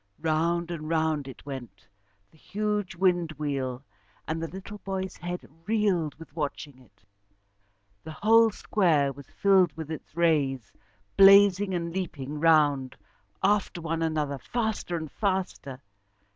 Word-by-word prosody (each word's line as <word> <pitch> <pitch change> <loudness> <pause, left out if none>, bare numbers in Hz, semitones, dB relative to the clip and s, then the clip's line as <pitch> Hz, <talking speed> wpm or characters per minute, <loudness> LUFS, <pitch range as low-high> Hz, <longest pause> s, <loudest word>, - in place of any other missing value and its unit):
Round 170 +2 0
and 155 -2 -5
round 160 -3 0
it 130 -1 -11
went, 135 -5 -9 0.4
the 160 - -23
huge 205 0 -2
wind 175 -3 +1
wheel, 135 -3 -3 0.4
and 160 +1 -2
the 165 - -2
little 195 +4 -9
boy's 190 -1 -4
head 175 +1 -5 0.3
reeled 200 -9 +1
with 160 -2 -14
watching 145 -3 -4
it. 100 -6 -24 1.0
The 160 - -8
whole 225 +6 +5
square 160 -10 +1
was 140 0 -13
filled 190 -5 +3
with 160 -1 -6
its 160 +1 -8
rays, 140 -9 +1 0.4
blazing 195 -1 +7
and 170 -1 -3
leaping 150 -6 -4
round 145 -5 +3 0.5
after 200 -3 +1
one 165 0 -3
another, 150 -4 -1
faster 220 - -2
and 160 -3 -6
faster. 185 -9 -2
165 Hz, 130 wpm, -27 LUFS, 145-190 Hz, 1.0 s, blazing